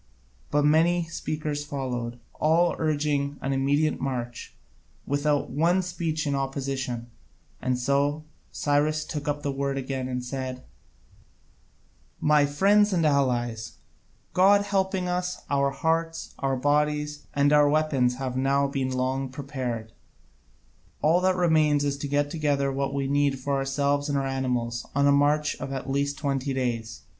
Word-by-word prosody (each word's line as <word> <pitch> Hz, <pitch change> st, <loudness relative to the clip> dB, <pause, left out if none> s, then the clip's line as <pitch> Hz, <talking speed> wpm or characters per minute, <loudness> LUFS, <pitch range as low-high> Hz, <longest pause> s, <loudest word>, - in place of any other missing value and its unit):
But 145 Hz, 0 st, +2 dB
many 165 Hz, +3 st, +4 dB
speakers 155 Hz, -2 st, -3 dB
followed, 125 Hz, -4 st, -4 dB, 0.2 s
all 165 Hz, +3 st, +3 dB
urging 145 Hz, -2 st, 0 dB
an 135 Hz, -, -2 dB
immediate 145 Hz, +3 st, +1 dB
march, 120 Hz, -3 st, -4 dB, 0.5 s
without 145 Hz, +1 st, 0 dB
one 175 Hz, +5 st, +2 dB
speech 165 Hz, -3 st, -2 dB
in 145 Hz, -, 0 dB
opposition, 135 Hz, -3 st, -3 dB, 0.5 s
and 130 Hz, 0 st, 0 dB
so 140 Hz, +4 st, +1 dB, 0.3 s
Cyrus 150 Hz, +1 st, +1 dB
took 150 Hz, -1 st, -5 dB
up 145 Hz, 0 st, -2 dB
the 140 Hz, -, -1 dB
word 140 Hz, 0 st, -2 dB
again 130 Hz, -1 st, -3 dB
and 125 Hz, -1 st, -3 dB
said: 130 Hz, 0 st, -5 dB, 1.6 s
"My 150 Hz, -1 st, +4 dB
friends 205 Hz, +8 st, +4 dB
and 170 Hz, -3 st, +2 dB
allies, 120 Hz, -6 st, 0 dB, 0.6 s
God 200 Hz, +2 st, +5 dB
helping 190 Hz, -2 st, 0 dB
us, 180 Hz, 0 st, -2 dB
our 140 Hz, 0 st, +2 dB
hearts, 165 Hz, +3 st, -1 dB
our 135 Hz, -1 st, 0 dB
bodies, 150 Hz, +2 st, 0 dB
and 145 Hz, +1 st, +3 dB
our 145 Hz, -1 st, +6 dB
weapons 145 Hz, -5 st, +2 dB
have 130 Hz, -1 st, -4 dB
now 140 Hz, +2 st, +2 dB
been 135 Hz, -2 st, -2 dB
long 130 Hz, +1 st, -1 dB
prepared: 130 Hz, -5 st, -5 dB, 1.1 s
all 165 Hz, +4 st, +4 dB
that 185 Hz, 0 st, +3 dB
remains 155 Hz, -5 st, +3 dB
is 140 Hz, -1 st, 0 dB
to 145 Hz, -, -3 dB
get 145 Hz, +1 st, 0 dB
together 145 Hz, -3 st, 0 dB
what 135 Hz, 0 st, -1 dB
we 140 Hz, -1 st, -1 dB
need 140 Hz, 0 st, +2 dB
for 140 Hz, +2 st, -3 dB
ourselves 140 Hz, +1 st, 0 dB
and 140 Hz, -, +1 dB
our 135 Hz, -, 0 dB
animals 125 Hz, -3 st, -1 dB
on 140 Hz, 0 st, +3 dB
a 140 Hz, -, +5 dB
march 145 Hz, +1 st, +2 dB
of 135 Hz, -, -6 dB
at 135 Hz, 0 st, -4 dB
least 140 Hz, +1 st, -1 dB
twenty 140 Hz, -2 st, -1 dB
days. 120 Hz, -4 st, -2 dB
140 Hz, 145 wpm, -26 LUFS, 135-150 Hz, 1.6 s, our